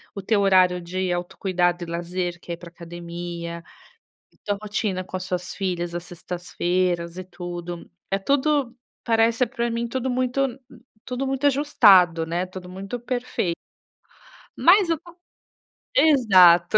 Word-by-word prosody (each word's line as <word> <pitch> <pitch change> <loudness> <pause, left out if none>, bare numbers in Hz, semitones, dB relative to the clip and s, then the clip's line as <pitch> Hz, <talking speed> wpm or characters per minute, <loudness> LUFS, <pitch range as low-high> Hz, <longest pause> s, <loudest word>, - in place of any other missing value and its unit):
o 200 - -4
teu 205 +2 +1
horário 185 -2 +4
de 185 +1 -2
autocuidado 175 0 -1
e - - -4
lazer 175 +1 -3
que 175 - -9
é - - -2
ir - - -20
para 170 0 -11
academia, 170 0 -7 0.7
e - - -30
tua 205 -1 -1
rotina 205 -3 -2
com 185 - -8
as 185 - -3
suas 180 0 -4
filhas 175 -3 -3
às 175 - -4
sextas-feiras 175 0 -2
e 185 - -5
tudo, 175 -1 -7 0.2
é 195 - +1
tudo, 275 +2 +1 0.3
parece 230 +1 +3
para 235 0 -2
mim 235 +1 -2
tudo 260 +1 -2
muito 255 +1 0 0.5
tudo 255 +1 -3
muito 270 +1 -1
ajustado, 195 - +5
né, 175 +3 -2
tudo 185 0 -9
muito 195 +6 -6
perfeito. 245 -8 -2 1.0
Mas 370 +1 +5
eu 330 -2 +1
to 345 +1 -16 0.8
exato. 195 - +6
185 Hz, 145 wpm, -24 LUFS, 175-240 Hz, 1.0 s, exato